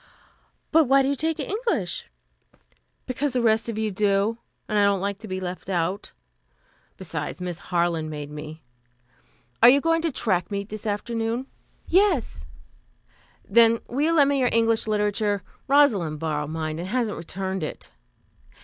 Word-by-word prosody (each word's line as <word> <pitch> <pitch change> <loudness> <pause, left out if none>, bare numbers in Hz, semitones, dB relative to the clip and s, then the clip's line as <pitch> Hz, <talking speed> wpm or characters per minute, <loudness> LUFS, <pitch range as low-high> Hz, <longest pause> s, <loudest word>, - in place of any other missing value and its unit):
"But 320 0 +5
why 270 +1 +4
do 265 - +1
you 280 - +1
take 320 +3 -1
English?" 450 +3 -2 1.0
"Because 265 +2 -1
the 250 - +1
rest 220 0 +2
of 225 - -4
you 220 -1 -1
do, 205 +3 +1 0.3
and 210 -1 +1
I - - +5
don't 200 -1 +3
like 200 +1 -3
to 220 - -9
be 185 -1 -3
left 185 0 -6
out. 185 +2 -1 0.9
Besides, 160 -5 -5
Miss 180 -2 -4
Harland 170 -3 0
made 150 -1 -6
me. 150 +1 -8 1.0
Are 235 - +10
you 275 +3 +6
going 330 +2 +1
to 330 -1 0
track 190 -8 0
meet 200 0 -4
this 215 +1 -6
afternoon?" 225 +3 -2 0.4
"Yes." 340 - +1 1.0
"Then, 230 +2 +5
will 260 +4 -2
you 325 +2 +3
lend 285 -4 +5
me 280 - +1
your 250 -2 +3
English 225 -1 +2
Literature? 210 -1 0 0.2
Rosalind 225 - +3
borrowed 150 -2 -2
mine 155 0 -3
and 175 - -4
hasn't 230 0 -1
returned 190 +3 -4
it." 155 - -6
210 Hz, 160 wpm, -24 LUFS, 180-250 Hz, 1.0 s, Are